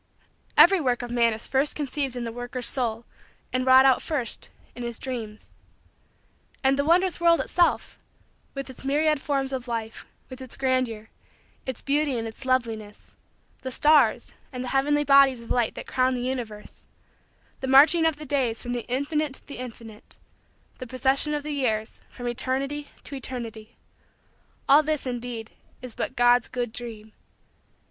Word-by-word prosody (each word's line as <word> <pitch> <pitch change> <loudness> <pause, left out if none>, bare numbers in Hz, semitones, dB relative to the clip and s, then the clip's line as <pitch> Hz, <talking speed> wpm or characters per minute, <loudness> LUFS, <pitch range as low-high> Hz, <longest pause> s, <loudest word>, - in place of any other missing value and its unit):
Every 380 0 +7
work 245 -3 0
of 240 - -6
man 235 -1 +3
is 220 +1 -5
first 275 +2 +1
conceived 280 -3 -3
in 245 - -4
the 230 - -4
worker's 245 +1 -5
soul 235 -3 -1 0.5
and 255 0 0
wrought 260 +1 +8
out 265 -2 +4
first 275 -8 -3 0.3
in 245 - -8
his 235 -1 -3
dreams. 225 -5 -6 1.1
And 265 0 +4
the 280 - +1
wondrous 350 +4 +2
world 335 -1 +5
itself, 350 -1 +1 0.6
with 275 0 -5
its 260 -1 -11
myriad 300 +1 +1
forms 275 -2 0
of 255 -1 -4
life, 225 -2 -5 0.2
with 260 0 -10
its 260 -2 -8
grandeur, 255 -5 -1 0.6
its 260 -3 -5
beauty 285 -2 +1
and 225 0 -3
its 225 +4 -10
loveliness; 225 -5 -2 0.5
the 260 - -4
stars 295 +4 +3 0.2
and 250 -1 -5
the 250 - -5
heavenly 290 +2 +2
bodies 275 -3 +5
of - - -12
light 240 -2 +1
that - - -7
crown 255 0 +1
the 245 - -3
universe; 240 -5 -5 0.8
the 265 - -4
marching 310 +5 +6
of 320 - 0
the 300 +1 -9
days 255 -5 -1
from 245 -1 -3
the 240 -1 -4
Infinite 285 +2 -1
to - - -12
the 280 - -9
Infinite; 230 -3 -10 0.6
the 255 - -7
procession 265 +4 +1
of 295 - -3
the 300 - -4
years 220 -6 -2
from 245 -1 -7
Eternity 275 +4 -2 0.2
to - - -9
Eternity; 235 -4 -7 0.9
all 285 +3 +7
this, 305 -2 -2
indeed, 240 -2 -5 0.3
is 255 -2 -9
but 260 - -4
God's 245 0 +4
good 240 -3 -4
dream. 220 -3 -7
255 Hz, 165 wpm, -25 LUFS, 235-280 Hz, 1.1 s, wrought